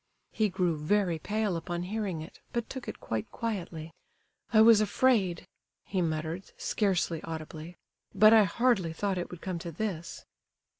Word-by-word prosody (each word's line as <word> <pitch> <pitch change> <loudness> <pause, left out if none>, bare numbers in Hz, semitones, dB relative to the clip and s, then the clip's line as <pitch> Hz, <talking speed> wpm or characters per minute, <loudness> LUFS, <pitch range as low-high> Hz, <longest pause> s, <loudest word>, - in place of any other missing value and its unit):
He 215 -2 +1
grew 180 -4 0
very 175 +1 +1
pale 210 +2 -1
upon 175 +1 -3
hearing 190 -4 -3
it, 160 - -13
but 235 -1 -1
took 260 -2 -7
it - - -6
quite 110 -1 -3
quietly. 175 -8 -4 0.6
"I 220 - +5
was 220 -1 +7
afraid," 205 -5 +2 0.4
he 190 -2 -1
muttered, 160 +2 -3
scarcely 180 -6 0
audibly, 160 +1 -7 0.4
"but 215 +1 +7
I 220 -2 +7
hardly 195 -4 +1
thought 195 +2 -1
it 175 - -4
would 180 - -10
come 185 -3 -3
to 170 0 -6
this." 170 -2 -4
185 Hz, 155 wpm, -29 LUFS, 165-215 Hz, 0.6 s, was